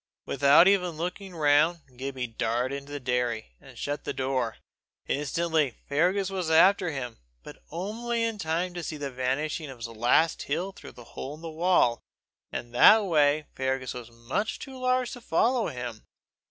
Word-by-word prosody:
Without 140 +6 +6
even 180 -5 +2
looking 180 +2 -5
round, 155 +2 +3
Gibbie 130 0 -4
darted 120 +3 -1
into 140 +1 -8
the 145 - -4
dairy, 125 - -1
and - - -15
shut 145 +1 -3
the - - -3
door. 130 -3 -1 0.5
Instantly 150 -2 0
Fergus 180 +7 +1
was 185 -4 -2
after 180 +3 +5
him, 130 -6 -5 0.2
but - - -12
only 230 +7 -2
in 225 -2 -2
time 170 +2 -1
to 175 - -5
see 155 -1 -5
the 140 -2 -4
vanishing 135 +5 -2
of 130 - -9
his 115 - -5
last 120 +8 +2
heel 175 +7 -2
through - - -12
the 120 - -12
hole 140 +3 -6
in 155 - -15
the 165 -1 -6
wall, 160 -8 +2 0.5
and 120 0 -6
that 215 - +7
way 150 -3 +3
Fergus 130 -1 -2
was 120 -2 -8
much 120 - -3
too 265 -1 -9
large 255 -1 +1
to 245 - -8
follow 230 +5 +2
him. 120 -3 -6
150 Hz, 170 wpm, -27 LUFS, 130-180 Hz, 0.5 s, that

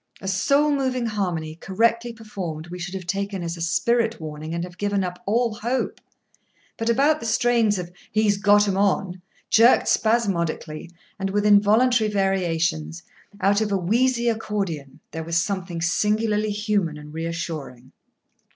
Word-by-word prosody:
A 190 - -7
soul 280 +10 +2
moving 260 -3 0
harmony, 180 -8 -2
correctly 230 +7 0
performed, 185 -8 -7
we 180 - -6
should 180 +2 -5
have 185 -2 -6
taken 195 +1 -3
as 170 0 -3
a 170 - -9
spirit 230 +7 +1
warning, 155 0 -7
and 170 - -2
have 180 0 -9
given 205 -1 0
up 180 0 -5
all 230 +2 +1
hope. 240 +5 -2 0.7
But 225 +1 -2
about 285 +6 +3
the 230 - -5
strains 225 -2 +2
of 175 -1 -5 0.2
"He's 215 -2 +2
got 205 0 +4
'em 195 -1 0
on," 190 -2 0 0.3
jerked 230 +3 +5
spasmodically, 170 -9 0 0.3
and 195 0 -1
with 205 +1 0
involuntary 215 +3 +4
variations, 165 - -1 0.4
out 200 +3 +3
of 210 -1 -1
a 200 - +2
wheezy 240 +6 +1
accordion, 195 - -3
there 160 +1 -5
was 165 +1 -1
something 175 -1 -2
singularly 210 +4 +1
human 205 -6 -1
and 150 0 -11
reassuring. 160 -6 -5
200 Hz, 150 wpm, -23 LUFS, 170-225 Hz, 0.7 s, jerked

